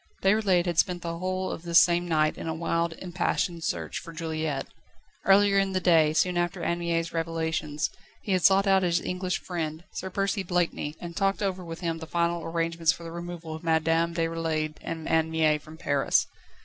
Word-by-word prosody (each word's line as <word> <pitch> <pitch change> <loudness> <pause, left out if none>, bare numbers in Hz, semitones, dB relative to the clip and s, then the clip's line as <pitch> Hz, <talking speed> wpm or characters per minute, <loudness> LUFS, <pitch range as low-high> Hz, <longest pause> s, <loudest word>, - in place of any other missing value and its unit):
Déroulède 195 -3 +3
had 170 -2 0
spent 180 -1 +1
the 170 0 -4
whole 185 +1 -2
of - - -5
this 170 0 +5
same 175 0 +3
night 155 -2 +2
in - - -7
a 160 - -2
wild, 170 0 0
impassioned 175 -1 -2
search - - -2
for 170 - -10
Juliette. 160 -3 -3 0.6
Earlier 195 0 +6
in 195 -1 0
the 185 - +1
day, 165 -4 +4
soon 175 +3 +2
after 175 -1 -2
Anne 170 0 0
Mie's 170 -1 -1
revelations, 160 -2 -2 0.3
he 205 - -3
had 185 -1 +2
sought 195 +2 +5
out 195 -1 +4
his 175 -1 +2
English 180 0 -2
friend, 160 -2 -4
Sir 190 - -5
Percy 195 +2 -1
Blakeney, 175 -4 -1
and 170 -1 -7
talked 195 +1 +1
over 190 -2 -2
with 165 0 -8
him 165 -2 -2
the 160 - -8
final 170 0 0
arrangements 165 0 +1
for 170 - -8
the 165 - -7
removal 170 -1 -6
of 160 - -7
Madame 165 +1 +2
Déroulède 165 -2 -1
and 165 -1 -5
Anne 160 0 +2
Mie 155 -2 +2
from 155 +2 -13
Paris. 140 -3 +2
170 Hz, 195 wpm, -27 LUFS, 160-180 Hz, 0.6 s, Earlier